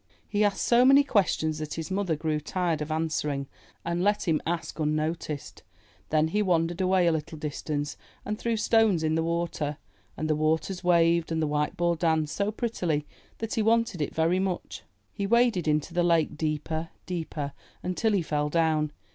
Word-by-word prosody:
'* - - -37
He 210 - +4
asked 205 -2 +1
so 240 +1 +5
many 275 +2 +7
questions 165 - +1
that 155 -1 -4
his 165 +3 -5
mother 190 -4 0
grew 155 0 -1
tired 170 0 -1
of 150 - -4
answering 155 -3 -1 0.4
and 170 +1 -1
let 205 -1 +1
him 160 -2 +2
ask 170 -2 -3
unnoticed. 155 0 -2 0.5
Then 155 0 +2
he 210 +5 +1
wandered 175 -2 +1
away 185 -1 +3
a 170 - +4
little 160 0 -3
distance 150 -1 -3 0.3
and 210 +1 -3
threw 230 -1 0
stones 215 -6 +3
in 155 0 +1
the 160 - +1
water. 165 -3 -2 0.4
And 155 - -2
the 155 - +2
waters 160 +5 0
waved 170 -1 +3
and 160 - 0
the 160 - +1
white 150 0 -1
ball 175 0 +2
danced 160 -2 0
so 205 +1 0
prettily 180 -10 -1 0.3
that 225 -1 -4
he 225 - +1
wanted 225 -5 +2
it 145 - -3
very 165 +3 +2
much. 190 -2 -3 0.3
He 200 -1 -2
waded 235 -6 +3
into 150 +2 0
the 175 - +2
lake, 165 -3 +2
deeper, 155 +1 -2 0.2
deeper, 160 -5 -4 0.3
until 195 +5 0
he 190 -4 +2
fell 150 -1 -1
down. 155 -2 +1
165 Hz, 185 wpm, -27 LUFS, 155-190 Hz, 0.5 s, many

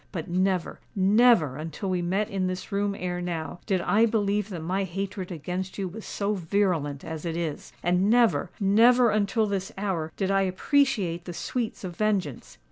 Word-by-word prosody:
But, 165 -6 -5
never—never, 190 - +2
until 165 +5 -4
we 180 -1 0
met 190 +4 0
in 195 -3 -1
this 185 +3 -5
room 200 0 0
ere 180 0 -3
now, 170 -2 -4
did 190 -4 +1
I 220 +5 +3
believe 210 -2 0
that 175 -5 -6
my 190 +4 0
hatred 190 0 -4
against 180 +3 -4
you 195 -2 -2
was 210 +5 -9
so 205 +1 -1
virulent 170 -6 0
as 160 -1 -6
it 165 -1 -3
is. 165 -4 -4
And 180 +3 +2
never—never 235 0 +4
until 215 +2 +1
this 200 0 -2
hour 180 -6 -2
did 195 -1 0
I 195 0 +3
appreciate 190 -3 +1
the 175 - -6
sweets 230 +5 -3
of 180 -2 -5
vengeance. 195 - -1
190 Hz, 170 wpm, -26 LUFS, 175-205 Hz, -, never—never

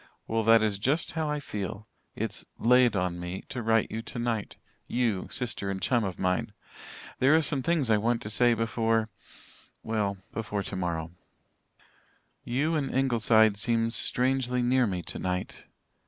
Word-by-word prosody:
Well, 115 0 -1
that 115 0 +6
is 105 -2 0
just 145 +10 0
how 160 -2 -2
I 150 0 -1
feel. 105 -5 -6 0.3
It's - - -3
'laid 125 -1 +4
on 90 -2 -1
me' 90 +2 -5
to 125 - -4
write 115 -1 +1
you 110 - -3
tonight 120 -2 -3 0.3
you, 115 -6 -1
sister 115 -5 -3
and 95 -1 -3
chum 120 +4 +1
of 95 -3 -4
mine. 90 0 -1 0.7
There 135 +4 +5
are 160 - +4
some 140 -1 -1
things 150 -5 +1
I 105 - +4
want 115 +2 0
to 105 - -4
say 120 +1 +3
before 115 -1 0 0.7
well, 105 -3 -1
before 105 -2 -3
tomorrow. 85 -3 -3 1.3
"You 140 +7 0
and 145 -4 -1
Ingleside 110 -5 +3
seem 115 +1 +1
strangely 125 0 +2
near 125 0 +3
me 90 -3 -3
tonight. 90 +1 -4
115 Hz, 155 wpm, -28 LUFS, 100-125 Hz, 1.3 s, that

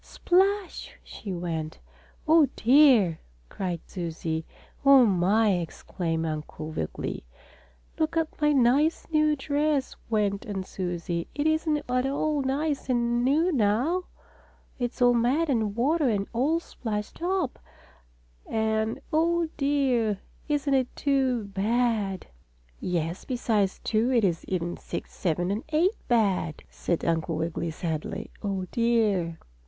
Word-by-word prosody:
"Splash!" 385 +1 0
she 200 - -8
went. 165 -3 -4 0.5
"Oh, 315 -2 +6
dear!" 240 - +5 0.3
cried 180 -4 -3
Susie. 165 -2 -4 0.4
"Oh, 275 -2 +8
my!" 205 +2 +3
exclaimed 165 0 -3
Uncle 155 0 -5
Wiggily. 80 - -4 0.8
"Look 315 +1 0
at 320 -1 -2
my 300 0 +4
nice, 280 +4 +3
new 305 -1 +3
dress," 290 0 0
went 205 -2 0
on 195 -2 -3
Susie. 175 -2 -3
"It 290 - -1
isn't 315 -1 +1
at 250 +1 +1
all 290 +1 0
nice 275 +1 -1
and 240 -1 +1
new 310 +8 +3
now. 265 - +1 0.7
It's 245 +1 -1
all 245 0 +6
mud 255 +8 +2
and 220 -5 0
water 285 +4 +2
and 200 -3 0
all 285 +8 +2
splashed 215 -9 -5
up, 360 -6 -1 0.9
and 220 0 0
oh, 335 +1 +2
dear! 265 -8 +1 0.3
Isn't 290 -2 0
it 260 -2 +1
too 265 -5 +1
bad!" 205 -1 0 0.5
"Yes, 170 0 -2
besides 220 -6 0
two 230 +3 +1
it 235 -3 +3
is 175 -4 0
even 175 -2 -2
six, - - -7
seven 175 +1 -1
and 210 +4 -2
eight 330 +6 +3
bad," 195 -9 +1
said 170 - -2
Uncle 165 -1 0
Wiggily 165 +1 -2
sadly. 160 +5 -4
"Oh, 195 -3 -2
dear!" 215 -8 +1
235 Hz, 125 wpm, -27 LUFS, 185-285 Hz, 0.9 s, Oh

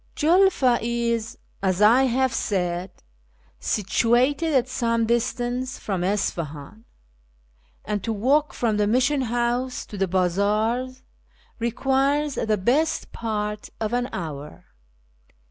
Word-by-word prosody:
JuLFA 320 -7 +3
is, 235 -1 -1 0.2
as 190 -1 0
I 235 +6 +6
have 260 0 +1
said, 180 -4 -1 0.7
situated 245 - +1
at 255 -1 +3
some 230 -3 0
distance 245 +2 -1
from 190 -4 -3
Isfahan, 180 0 -3 1.0
and 205 -2 -2
to 225 - -2
walk 270 +8 +2
from 225 -3 -1
the 210 -1 +2
Mission 260 +5 +2
House 245 +1 -1
to 205 - -9
the 195 - +1
bazaars 210 +8 0 0.6
requires 270 +5 +1
the 220 -3 0
best 265 +12 0
part 210 -2 -4
of 220 +1 -2
an 245 +1 0
hour. 150 - -7
235 Hz, 110 wpm, -24 LUFS, 205-255 Hz, 1.0 s, I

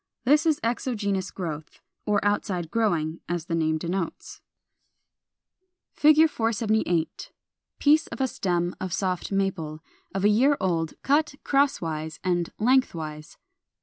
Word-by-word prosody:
This 300 +5 +4
is 310 -2 +2
exogenous 210 -5 -1
growth, 160 -5 -6 0.3
or 205 -1 +1
outside 190 -5 -1
growing, 170 -8 0
as 175 -2 -2
the 170 - -4
name 160 -1 +1
denotes. 170 +2 -4 1.6
[Illustration: 305 +1 +6
Fig. - - -15
478. 220 -7 0 0.5
Piece 300 +2 +4
of 230 - -8
a 265 - +2
stem 175 -6 -1
of 185 -2 -3
Soft 185 +1 -2
Maple, 175 -6 -2 0.3
of 195 +1 0
a - - +6
year 265 +7 +4
old, 165 -4 -1
cut 290 +1 +2
crosswise 165 - 0
and 175 -2 0
lengthwise. 165 -11 0
190 Hz, 125 wpm, -26 LUFS, 165-230 Hz, 1.6 s, Illustration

